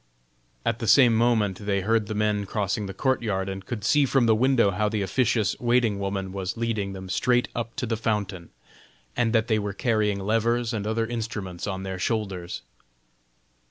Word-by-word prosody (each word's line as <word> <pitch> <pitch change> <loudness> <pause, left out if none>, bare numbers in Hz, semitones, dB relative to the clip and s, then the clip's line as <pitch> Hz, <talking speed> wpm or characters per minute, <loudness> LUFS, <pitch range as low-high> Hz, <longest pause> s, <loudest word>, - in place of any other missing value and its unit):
At 115 - 0
the 115 - -3
same 120 +1 +6
moment 110 -4 +1
they 100 -1 +1
heard 110 +1 +1
the 110 - -4
men 105 -1 0
crossing 105 0 -1
the 95 - -6
courtyard, 110 -7 0
and 95 0 -5
could 110 -2 -5
see 145 -2 +4
from 130 -2 +3
the 115 - +5
window 120 -2 +3
how 105 +3 0
the 105 -2 -1
officious 110 -1 +1
waiting 120 -4 +2
woman 100 -1 -3
was 95 0 -4
leading 110 -4 -2
them 95 0 -8
straight 125 +6 +1
up 115 0 -4
to - - -2
the 115 -1 -1
fountain, 100 -6 -2 0.7
and 115 -2 +1
that 115 0 +2
they 110 -2 +2
were 100 -1 -3
carrying 105 -2 +1
levers 115 +4 0
and 105 -2 -3
other 115 +1 0
instruments 110 -6 -5
on 95 -1 -3
their 95 -1 -5
shoulders. 95 -4 -3
110 Hz, 185 wpm, -25 LUFS, 100-115 Hz, 0.7 s, same